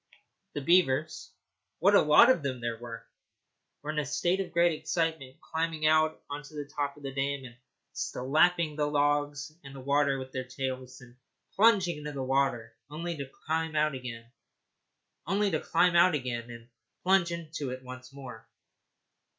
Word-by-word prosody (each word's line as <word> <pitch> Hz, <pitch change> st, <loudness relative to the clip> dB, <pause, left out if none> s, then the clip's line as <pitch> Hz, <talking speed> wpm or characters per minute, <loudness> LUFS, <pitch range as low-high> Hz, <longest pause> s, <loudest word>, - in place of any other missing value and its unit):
The 145 Hz, -, -3 dB
beavers 155 Hz, -2 st, +2 dB, 0.5 s
what 195 Hz, +5 st, +4 dB
a -, -, +7 dB
lot 150 Hz, +12 st, +7 dB
of 255 Hz, -, +1 dB
them 130 Hz, -3 st, -3 dB
there 120 Hz, -1 st, -3 dB
were! 115 Hz, -1 st, -8 dB, 0.8 s
were 150 Hz, -, -2 dB
in 155 Hz, -, -1 dB
a 150 Hz, -, -1 dB
state 175 Hz, +6 st, 0 dB
of 185 Hz, -3 st, -3 dB
great 170 Hz, +1 st, +4 dB
excitement, 160 Hz, -4 st, -2 dB
climbing 160 Hz, -1 st, -2 dB
out 155 Hz, 0 st, +3 dB
on 145 Hz, +1 st, -5 dB
to 150 Hz, +1 st, -14 dB
the 145 Hz, -1 st, -4 dB
top 145 Hz, 0 st, -3 dB
of 145 Hz, -, -15 dB
the 135 Hz, -1 st, -5 dB
dam 140 Hz, 0 st, -2 dB
and 120 Hz, -2 st, -11 dB, 0.4 s
slapping 155 Hz, +4 st, +1 dB
the 150 Hz, -1 st, 0 dB
logs 145 Hz, 0 st, 0 dB
and 135 Hz, -1 st, -11 dB
the -, -, -8 dB
water 140 Hz, +1 st, +2 dB
with 130 Hz, 0 st, -7 dB
their 130 Hz, -1 st, -4 dB
tails, 130 Hz, 0 st, -5 dB
then 125 Hz, -1 st, -16 dB, 0.4 s
plunging 195 Hz, -6 st, +4 dB
into 150 Hz, 0 st, -6 dB
the 135 Hz, -2 st, -3 dB
water, 135 Hz, -3 st, 0 dB
only 170 Hz, +3 st, -4 dB
to 140 Hz, -3 st, -6 dB, 0.2 s
climb 160 Hz, 0 st, -1 dB
out 155 Hz, 0 st, +2 dB
again 125 Hz, -3 st, -7 dB, 1.0 s
and 155 Hz, -, +1 dB, 0.4 s
plunge 185 Hz, -2 st, +3 dB
in 170 Hz, -2 st, -5 dB, 0.3 s
once 130 Hz, 0 st, -10 dB
more. 125 Hz, -5 st, -10 dB
145 Hz, 155 wpm, -29 LUFS, 130-165 Hz, 1.0 s, a